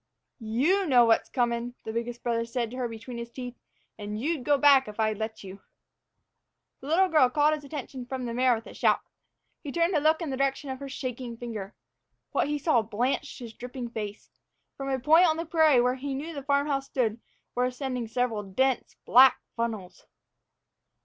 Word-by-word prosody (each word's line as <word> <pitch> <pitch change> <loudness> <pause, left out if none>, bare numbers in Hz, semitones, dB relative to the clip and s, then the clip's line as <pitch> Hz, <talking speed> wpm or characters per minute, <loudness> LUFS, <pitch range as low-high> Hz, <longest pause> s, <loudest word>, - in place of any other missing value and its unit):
"You 275 - +1
know 245 -4 +6
what's 225 -1 +2
comin'," 240 -1 -1
the 220 - -5
biggest 235 +1 -4
brother 230 -1 0
said 230 0 -3
to 255 - -7
her 250 -2 -1
between 230 +1 -8
his 235 0 -6
teeth; 245 0 -7 0.5
"and 210 +1 -5
you'd 295 +2 -1
go 290 +2 +3
back 275 -2 +6
if 210 +1 -9
I'd 215 -1 +1
let 220 0 -5
you." 195 0 -10 1.2
The 270 - -10
little 360 +5 +4
girl 305 -7 +4
called 295 +3 +3
his 305 -1 -4
attention 270 -3 -7
from 260 -1 -4
the 235 - -4
mare 250 0 +3
with 225 +1 -8
a - - -10
shout. - - +2 0.6
He 290 - -6
turned 340 +4 +1
to 305 - +3
look 310 +2 +3
in 330 -5 -4
the 265 - -3
direction 275 0 -1
of 260 - -6
her 280 0 -7
shaking 250 -2 -5
finger. 220 -5 -6 0.6
What - - +1
he 295 0 -1
saw 290 -5 +2
blanched 240 +7 -2
his 235 -4 -9
dripping 245 0 -7
face. 210 -2 -6 0.4
From 275 0 -5
a 265 - +1
point 320 +7 +5
on 315 -1 +1
the 330 - -3
prairie 315 -5 +4
where 250 +1 +2
he 270 +1 -4
knew 310 +5 -5
the 285 - -5
farm 280 +1 +1
house 275 -2 -1
stood 230 -3 -1 0.3
were 250 - +1
ascending 250 -2 -3
several 230 -2 -1
dense, 240 +6 -1
black 260 +2 +7 0.2
funnels! 220 -6 -4
250 Hz, 200 wpm, -27 LUFS, 230-280 Hz, 1.2 s, black